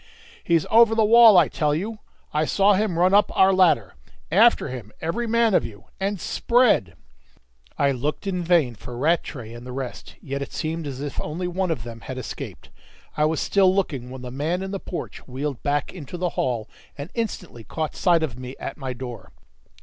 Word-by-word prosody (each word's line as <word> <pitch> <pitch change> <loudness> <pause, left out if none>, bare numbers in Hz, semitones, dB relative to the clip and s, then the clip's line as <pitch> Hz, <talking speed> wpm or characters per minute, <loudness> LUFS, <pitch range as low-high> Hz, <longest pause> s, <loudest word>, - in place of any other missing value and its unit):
"He's 165 -3 +2
over 225 0 +6
the 220 -1 +4
wall, 225 -2 +8
I 170 - +6
tell 150 -1 0
you! 210 +7 -4 0.3
I 150 +1 +2
saw 200 +5 +4
him 195 -3 0
run 180 +2 +3
up 205 0 +4
our 190 0 +6
ladder. 170 - +3 0.4
After 225 +7 +4
him 120 -5 -7
every 230 +9 -2
man 230 -1 +2
of - - +4
you 100 -4 -9
and 195 0 -1
spread!" 235 - +2 0.8
I 140 -1 +3
looked 140 +8 -3
in 185 -2 -1
vain 165 -8 +3
for 120 +2 -9
Rattray 135 -6 -1
and 120 0 -10
the 125 - -8
rest; 130 -1 -6
yet 140 -1 -5
it 140 - -6
seemed 160 0 -3
as 135 -1 -6
if 145 -1 -4
only 170 +4 -4
one 185 +1 -1
of 155 -9 -2
them 115 -1 -9
had 130 - -7
escaped. 130 - -8 0.4
I 150 - +2
was 155 0 0
still 190 -2 +3
looking 140 -11 -2
when 130 0 -9
the 125 - -7
man 160 +8 -2
in 190 - -5
the 195 - -3
porch 180 - -7
wheeled 135 +1 -4
back 145 0 -1
into 175 -1 -8
the 180 0 -1
hall, 120 -8 -2 0.3
and 140 +3 -7
instantly 190 - -4
caught 155 +8 -4
sight 170 -3 +3
of 125 -6 -4
me 130 +1 -7
at - - -6
my 130 -3 -4
door. 125 -2 -8
155 Hz, 200 wpm, -23 LUFS, 130-190 Hz, 0.8 s, wall